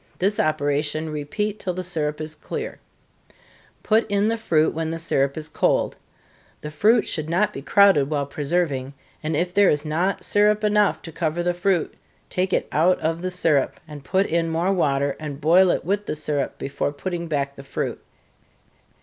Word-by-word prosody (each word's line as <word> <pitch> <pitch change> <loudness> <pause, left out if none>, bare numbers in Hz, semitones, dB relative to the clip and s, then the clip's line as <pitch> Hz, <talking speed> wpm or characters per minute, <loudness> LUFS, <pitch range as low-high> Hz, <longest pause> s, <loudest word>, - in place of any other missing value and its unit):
This 200 +3 0
operation 155 +1 0
repeat 200 +8 -3
till 180 -2 -3
the 185 - -3
syrup 155 -4 -1
is 155 0 -4
clear 455 - -6 1.0
put 220 0 +2
in 205 +1 +2
the 230 - +1
fruit 165 -9 +1
when 160 0 -2
the 165 - -3
syrup 140 -4 0
is 155 -1 -5
cold. 155 - +1 0.7
The 150 - -6
fruit 215 +9 +3
should 155 -1 -2
not 185 +4 +1
be - - -6
crowded 155 -4 +4
while 145 -2 0
preserving, 140 -2 -2 0.3
and 155 0 -2
if 175 +2 -1
there 205 0 +5
is 150 +1 0
not 170 +6 -1
syrup 210 +1 +2
enough 210 -1 +2
to 165 - -7
cover 165 +1 -2
the 175 0 +1
fruit, 175 -1 0 0.4
take 185 +1 0
it - - +1
out 175 +4 +3
of 165 +1 -1
the 185 - -2
syrup, 165 -6 +1
and 150 -2 -10
put 190 +6 +1
in 165 -1 0
more 170 +4 +1
water, 140 -5 +1
and 150 -3 -6
boil 175 +5 +5
it - - 0
with 200 +2 -1
the - - -2
syrup 150 -2 -2
before 140 +1 -2
putting 170 +3 -4
back 140 -3 -2
the 140 - -10
fruit. - - -4
165 Hz, 185 wpm, -23 LUFS, 150-185 Hz, 1.0 s, there